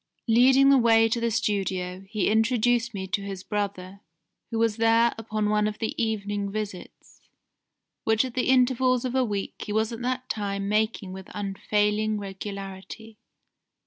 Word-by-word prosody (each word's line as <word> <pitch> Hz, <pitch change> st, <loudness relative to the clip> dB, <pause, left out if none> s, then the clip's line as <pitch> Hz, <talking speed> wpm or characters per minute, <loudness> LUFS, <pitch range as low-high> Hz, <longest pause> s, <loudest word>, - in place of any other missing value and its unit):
Leading 260 Hz, +4 st, +6 dB
the 275 Hz, -, +6 dB
way 225 Hz, -1 st, +5 dB
to 225 Hz, +1 st, -1 dB
the 235 Hz, -, +1 dB
studio, 195 Hz, -4 st, -2 dB
he 215 Hz, -2 st, 0 dB
introduced 235 Hz, +2 st, +2 dB
me 195 Hz, -3 st, -5 dB
to 205 Hz, +1 st, -1 dB
his 195 Hz, -2 st, -6 dB
brother, 200 Hz, -2 st, -4 dB, 0.5 s
who 225 Hz, -, -3 dB
was 225 Hz, -1 st, +1 dB
there 230 Hz, +1 st, +4 dB
upon 215 Hz, -1 st, -2 dB
one 210 Hz, 0 st, +2 dB
of 215 Hz, 0 st, -4 dB
the 220 Hz, -, -2 dB
evening 205 Hz, -2 st, -2 dB
visits, 205 Hz, -3 st, -7 dB, 0.8 s
which 220 Hz, +2 st, +2 dB
at 255 Hz, -, -7 dB
intervals 255 Hz, -1 st, +2 dB
of 250 Hz, -, -2 dB
a 260 Hz, 0 st, +2 dB
week 205 Hz, -4 st, -3 dB
he -, -, -4 dB
was 220 Hz, +2 st, 0 dB
at 230 Hz, +1 st, -6 dB
that 255 Hz, +1 st, -2 dB
time 200 Hz, -2 st, -3 dB
making 210 Hz, -2 st, -1 dB
with 190 Hz, 0 st, -10 dB
unfailing 210 Hz, +1 st, 0 dB
regularity. 200 Hz, +2 st, -8 dB
215 Hz, 155 wpm, -26 LUFS, 200-230 Hz, 0.8 s, Leading